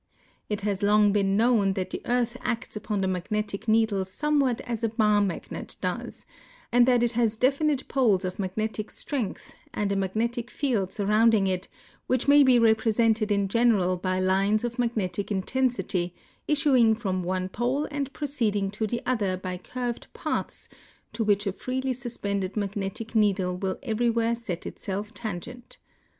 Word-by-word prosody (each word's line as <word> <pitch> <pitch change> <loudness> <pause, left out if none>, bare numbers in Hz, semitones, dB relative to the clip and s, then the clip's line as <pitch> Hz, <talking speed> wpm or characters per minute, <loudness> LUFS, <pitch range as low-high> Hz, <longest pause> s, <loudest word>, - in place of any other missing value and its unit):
It 210 -1 -2
has 200 -2 -1
long 205 0 +4
l)een 195 -1 +2
known 220 -4 +3
that 190 -1 -3
the - - -4
earth 245 0 0
acts 245 -1 -3
upon 210 -1 -2
the 190 - +1
magnetic 200 +3 -3
needle 220 -3 +3
somewhat 265 +5 0
as 235 -2 -5
a 225 - +2
bar 210 -2 +3
magnet 190 -4 -4
does, - - -4 0.5
and 240 +1 +5
that 245 -2 +4
it 240 - +2
has 230 -2 +1
delinite 275 +2 +1
poles 215 -8 +2
of 185 +2 -5
magnetic 215 +3 -3
strength 255 -9 -4 0.2
and 205 -1 0
a - - +1
magnetic 230 +5 -1
field 225 -10 -1
surrounding 215 +1 +3
it 185 0 -1 0.4
Avhich 255 +1 +1
may 290 +1 +7
be 260 -3 +6
represented 220 -1 +3
in 200 -1 +2
general 205 -4 +3
by 185 +1 -1
lines 195 +3 +2
of 240 0 -4
magnetic 205 -5 -1
in 190 -2 0
tensity 190 -9 -1 0.3
issuing 265 -7 +4
from 190 -5 -2
one 185 +1 -2
pole 245 +9 -1
anil 285 -2 -3
proceeding 225 -10 -1
to 215 +1 -2
the 235 +3 -3
other 205 -7 0
by 185 0 -4
curved 240 +6 -5
paths - - -3 0.5
to 230 - -1
which 205 0 +2
a 200 - 0
freely 260 +5 -2
suspended 200 -6 -3
magnetic 205 +2 -3
needle 195 -4 +2
will 190 +1 -2
ever3Mvhere 230 +1 +1
set 215 -7 -6
itself 205 +2 -5
tangent. 235 +4 -7
215 Hz, 160 wpm, -26 LUFS, 195-240 Hz, 0.5 s, may